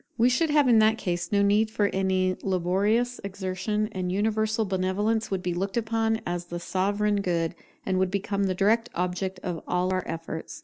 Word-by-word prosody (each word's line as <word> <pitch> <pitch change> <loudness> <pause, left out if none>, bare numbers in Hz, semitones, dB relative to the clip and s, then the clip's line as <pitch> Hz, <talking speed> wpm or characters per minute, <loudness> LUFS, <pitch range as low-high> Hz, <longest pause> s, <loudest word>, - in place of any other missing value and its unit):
We 235 +2 +5
should 280 +6 +2
have 295 -2 +4
in 235 -3 +6
that 220 +1 +4
case 175 -4 -3
no 200 -1 +3
need 210 +2 +3
for 215 -1 +1
any 185 -1 +1
laborious 195 +7 +1
exertion; 195 +2 -2
and 185 -3 -3
universal 220 +2 +1
benevolence 195 +4 0
would 190 -2 -2
be 180 -1 -1
looked 195 +4 -2
upon 225 -1 0
as 175 0 -3
the 175 0 -5
sovereign 205 +3 0
good, 170 -3 0 0.3
and 185 -1 0
would 190 0 +2
become 200 +1 -1
the 185 -1 0
direct 220 +5 +2
object 180 +1 -2
of 175 -3 -3
all 180 +1 0
our 185 - 0
efforts. 165 - -6
195 Hz, 185 wpm, -26 LUFS, 185-220 Hz, 0.3 s, in